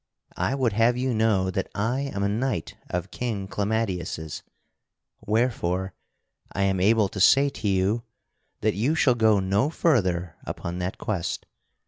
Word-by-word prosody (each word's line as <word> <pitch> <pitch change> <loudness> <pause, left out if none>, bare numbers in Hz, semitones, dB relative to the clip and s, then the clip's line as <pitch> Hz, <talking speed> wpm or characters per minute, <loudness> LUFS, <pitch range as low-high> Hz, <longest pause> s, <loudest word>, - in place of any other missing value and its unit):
I 135 - 0
would 125 -6 +1
have 115 +3 +3
you 130 0 0
know 105 -4 +2
that 95 +1 -2
I 115 +6 0
am 100 0 -2
a - - +2
knight 110 -4 -2
of - - -3
King 110 -6 -3
Clamadius', 95 -7 -2 0.9
wherefore 100 -5 0 0.6
I 100 - -1
am 95 -1 +1
able 105 +2 +4
to 100 - -6
say 135 +9 +6
to 110 -5 -5
you 100 +4 +1 0.6
that 110 0 +2
you 125 +10 +1
shall 140 -5 +4
go 110 -3 +4
no 100 +8 +1
further 90 - +1
upon 85 +1 -5
that 90 +1 -3
quest. 95 -6 -3
105 Hz, 150 wpm, -25 LUFS, 95-120 Hz, 0.9 s, say